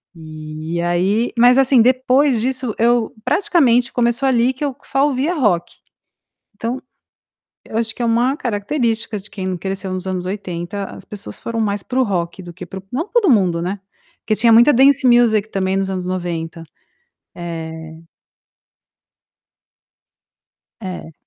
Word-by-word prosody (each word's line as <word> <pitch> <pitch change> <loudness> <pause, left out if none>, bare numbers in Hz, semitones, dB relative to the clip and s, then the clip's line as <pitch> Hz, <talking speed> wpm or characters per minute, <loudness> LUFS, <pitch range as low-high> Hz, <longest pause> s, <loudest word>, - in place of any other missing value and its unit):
E 155 +1 -6
aí 185 +7 0
mas 245 +2 +6
assim 265 -2 +5
depois 255 +1 +3
disso 255 -2 -2
eu 235 0 +2
praticamente 265 - +2
começou 240 +2 +1
ali 250 0 +2
que 260 - -7
eu 280 - -2
só 275 +1 +1
ouvia 290 +5 0
rock. 205 - 0 0.8
Então, 235 +4 -3 0.9
eu 220 - -7
acho 225 -1 -2
que - - -19
é - - +1
uma 240 +4 +2
característica 225 -1 -2 0.4
cresceu 190 0 -4
nos 185 0 -4
anos 185 -1 -3
80, 190 0 -4
as 195 - -10
pessoas 190 - -9
foram 230 -1 -4
mais 205 -2 -1
para 260 +1 -1
o - - +4
rock 180 -3 -3
do 175 -1 -10
que 180 - -8
para 190 - -8
o - - -23
não 320 +11 -2
todo 470 -5 +2
mundo, 185 -8 +3
né, 190 +4 -3 0.4
porque 215 - -1
tinha 230 +2 +5
muita 240 +6 +7
dance 275 +2 +4
music 230 -3 +4
também 190 -1 -1
nos 195 0 -1
anos 185 -1 -3
90. 170 -2 -4 0.7
Eh 160 -2 -7 2.8
É. 185 -5 -7
220 Hz, 145 wpm, -19 LUFS, 180-250 Hz, 2.8 s, muita